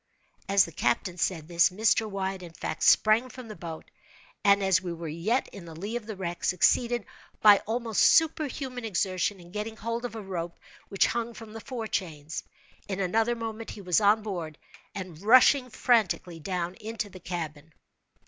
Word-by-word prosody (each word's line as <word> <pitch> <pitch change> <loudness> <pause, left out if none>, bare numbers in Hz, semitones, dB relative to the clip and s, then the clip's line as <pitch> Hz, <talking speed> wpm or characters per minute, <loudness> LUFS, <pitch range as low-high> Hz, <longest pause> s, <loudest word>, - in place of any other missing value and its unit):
As 195 -1 +5
the 165 - -10
captain 165 +7 -1
said 160 -3 -1
this, 170 -1 +4
Mr. 220 +3 +2
Wyatt, 190 -1 -3
in 170 -2 -10
fact, 160 - -5
sprang 220 +4 +5
from 255 -1 -10
the 215 - -7
boat, 165 -4 -8 0.5
and, 200 -1 +5
as 190 -2 +3
we 180 -2 -4
were 170 -1 -6
yet 175 - 0
in 190 - -11
the 165 -1 -10
lee 205 +8 -5
of 235 -3 -5
the 215 - -5
wreck, 175 -2 -5
succeeded, 235 +5 +2 0.3
by 205 -2 +7
almost 225 -1 0
superhuman 290 -6 +2
exertion, 190 -1 -1
in 175 0 -14
getting 215 +2 -5
hold 230 +2 -3
of 240 -2 -5
a 220 - -5
rope 175 -3 -5 0.3
which 195 - +3
hung 235 -1 -2
from 220 -1 -10
the 225 - -7
fore 240 -2 -5
chains. 160 -7 -4 0.4
In 195 -1 -3
another 220 +5 +1
moment 225 -1 -6
he 205 - -8
was 180 +2 +2
on 210 +1 +4
board, 170 -7 -5 0.4
and 180 -4 -7
rushing 255 +4 +6
frantically 215 -8 +1
down 175 +1 -3
into 220 0 -4
the 185 -2 -12
cabin. 160 -3 -6
200 Hz, 180 wpm, -28 LUFS, 175-225 Hz, 0.5 s, by